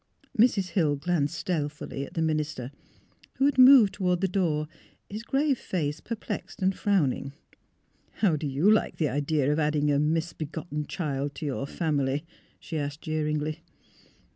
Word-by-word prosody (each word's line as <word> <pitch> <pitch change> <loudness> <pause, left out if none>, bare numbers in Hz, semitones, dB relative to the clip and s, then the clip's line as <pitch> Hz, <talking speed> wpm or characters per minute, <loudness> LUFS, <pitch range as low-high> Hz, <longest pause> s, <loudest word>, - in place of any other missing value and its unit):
Mrs. 210 -5 +3
Hill 160 -6 +2
glanced 155 +1 -1
stealthily 150 -5 -3
at - - -16
the 165 - +1
minister, 155 -5 -2 0.6
who 270 - +2
had 285 -2 +2
moved 255 -5 +8
toward 180 -3 0
the 195 - +2
door, 165 -5 0 0.4
his 210 +2 -4
grave 270 +2 +1
face 150 -4 -2
per 230 - -5
plexed 220 - -6
and 190 0 +2
frowning. 150 -10 0 0.4
" - - -40
How 190 -7 +4
do 150 0 -3
you 140 +7 +1
like 215 - +2
the 155 -3 +1
idea 145 +1 +1
of 150 - -1
adding 150 -1 +1
a 140 - +2
misbe 155 0 -1
gotten 150 -3 -5
child 145 -4 -3
to 155 - -6
your 135 -1 -2
family? 145 -2 -1 0.2
" - - -35
she 160 -3 -4
asked, 145 +1 -4
jeer 155 -1 -2
ingly. 150 0 -2
155 Hz, 170 wpm, -27 LUFS, 145-185 Hz, 0.6 s, moved